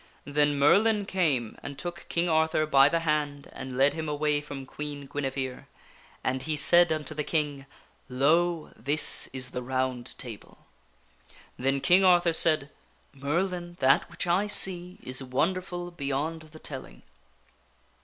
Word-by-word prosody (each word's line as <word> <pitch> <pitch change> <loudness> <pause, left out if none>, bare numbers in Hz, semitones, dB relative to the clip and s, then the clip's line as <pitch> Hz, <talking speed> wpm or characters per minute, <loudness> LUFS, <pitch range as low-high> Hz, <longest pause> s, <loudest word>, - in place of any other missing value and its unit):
Then 145 0 +1
Merlin 205 +9 +4
came 150 - 0
and 140 - -7
took 175 -1 -6
King 170 +1 0
Arthur 160 -1 +2
by 140 -2 +5
the 165 +1 0
hand 150 -3 -1
and 130 -1 -7
led 140 +2 +4
him 160 -1 -4
away 150 0 0
from 140 -2 -8
Queen 145 +1 -7
Guinevere. 135 -2 -4 0.6
And 130 +1 -1
he 155 +2 -2
said 175 +3 +5
unto 155 0 -2
the 150 0 -3
King, 145 -3 -2 0.2
" - - -35
Lo! 170 +2 +2
this 145 +6 +2
is 130 -1 -3
the 125 - -4
Round 130 -1 -2
Table." 115 -5 -10 0.9
Then 135 +2 0
King 180 +6 +5
Arthur 175 -2 +5
said, 155 -3 +3 0.2
" - - -36
Merlin, 175 +5 -2
that 135 +2 +3
which - - -5
I 180 +4 +2
see 180 -3 0
is 130 +1 -6
wonderful 175 +7 -2
beyond 150 +1 -3
the 155 0 -14
telling." 135 -4 -9
150 Hz, 150 wpm, -28 LUFS, 135-175 Hz, 0.9 s, by